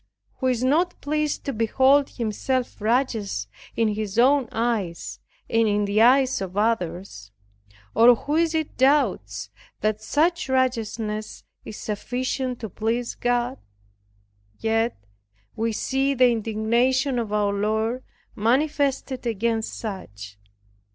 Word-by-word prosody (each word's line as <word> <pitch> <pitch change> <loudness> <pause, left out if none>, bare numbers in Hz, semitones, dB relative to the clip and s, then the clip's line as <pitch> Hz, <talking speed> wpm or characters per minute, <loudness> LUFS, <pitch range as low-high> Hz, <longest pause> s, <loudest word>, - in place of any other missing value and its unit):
Who 260 - -1
is 250 -1 0
not 330 +7 +1
pleased 300 0 -1
to 275 - -2
behold 265 +5 +3
himself 240 +2 -2
righteous 220 - 0 0.3
in 225 -1 +2
his 210 -1 -3
own 260 0 +4
eyes, 220 -7 -2 0.3
and 225 0 +2
in 205 0 +1
the 205 +2 +2
eyes 260 +2 +4
of 190 0 -5
others? 180 - -1 0.6
or, 235 +2 +7
who 290 +6 -3
is 330 0 +2
it 315 -1 -2
doubts 210 - +1 0.3
that 215 0 0
such 325 +6 +1
righteousness 225 -4 -1 0.2
is 215 - -8
sufficient 250 +4 -3
to 220 - -3
please 230 +5 -2
God? 245 +1 -1 1.0
Yet, 225 +1 0 0.6
we 225 +1 0
see 270 +5 0
the 250 -1 +5
indignation 235 +4 +1
of 225 -3 -3
our 205 -1 +1
Lord 220 +5 -1 0.3
manifested 265 +2 0
against 225 0 -1
such. 105 - -7
230 Hz, 120 wpm, -24 LUFS, 215-260 Hz, 1.0 s, or